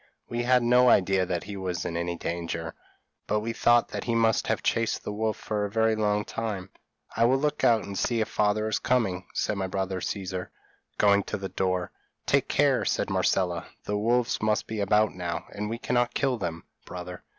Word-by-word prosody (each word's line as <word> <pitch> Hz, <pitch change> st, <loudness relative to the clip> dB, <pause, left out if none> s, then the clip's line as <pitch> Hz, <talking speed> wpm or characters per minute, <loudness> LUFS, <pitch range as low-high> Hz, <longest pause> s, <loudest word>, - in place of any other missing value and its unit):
We 120 Hz, 0 st, -2 dB
had 125 Hz, 0 st, +3 dB
no 125 Hz, +1 st, +5 dB
idea 95 Hz, -2 st, +3 dB
that 90 Hz, -1 st, -2 dB
he 100 Hz, 0 st, -7 dB
was 95 Hz, -2 st, -3 dB
in 85 Hz, -, -3 dB
any 85 Hz, 0 st, -2 dB
danger, 85 Hz, -1 st, -4 dB, 0.5 s
but 105 Hz, 0 st, +1 dB
we 115 Hz, +2 st, -3 dB
thought 120 Hz, 0 st, +3 dB
that -, -, -5 dB
he 115 Hz, -, 0 dB
must 115 Hz, -1 st, +2 dB
have -, -, 0 dB
chased 115 Hz, 0 st, 0 dB
the 105 Hz, -, -4 dB
wolf 110 Hz, +1 st, -1 dB
for 105 Hz, -1 st, -2 dB
a 105 Hz, -, -1 dB
very 110 Hz, +1 st, +2 dB
long 105 Hz, -1 st, +1 dB
time. 100 Hz, -4 st, -4 dB, 0.4 s
'I 115 Hz, -, +4 dB
will 130 Hz, +3 st, +4 dB
look 150 Hz, +2 st, -1 dB
out 115 Hz, -3 st, +4 dB
and 100 Hz, 0 st, -7 dB
see 115 Hz, +3 st, 0 dB
if 110 Hz, -, 0 dB
father 105 Hz, 0 st, +1 dB
is 110 Hz, -, 0 dB
coming,' 95 Hz, -8 st, 0 dB
said 105 Hz, -, 0 dB
my 95 Hz, -1 st, -1 dB
brother 95 Hz, 0 st, -2 dB
Caesar, 95 Hz, -2 st, -4 dB, 0.5 s
going 100 Hz, -1 st, +5 dB
to -, -, -3 dB
the 95 Hz, -1 st, -5 dB
door. 90 Hz, -1 st, -1 dB, 0.3 s
'Take -, -, +2 dB
care,' -, -, +3 dB
said -, -, 0 dB
Marcella, 90 Hz, -4 st, +1 dB, 0.2 s
'the 105 Hz, -, -2 dB
wolves 120 Hz, +2 st, +1 dB
must 105 Hz, 0 st, +1 dB
be 110 Hz, -1 st, -5 dB
about 105 Hz, +2 st, +3 dB
now, 90 Hz, -2 st, -4 dB
and 105 Hz, +1 st, -4 dB
we 115 Hz, -, -3 dB
cannot 120 Hz, 0 st, 0 dB
kill 130 Hz, -4 st, +1 dB
them, 85 Hz, -4 st, -4 dB, 0.2 s
brother.' 90 Hz, 0 st, -8 dB
105 Hz, 205 wpm, -27 LUFS, 95-115 Hz, 0.5 s, no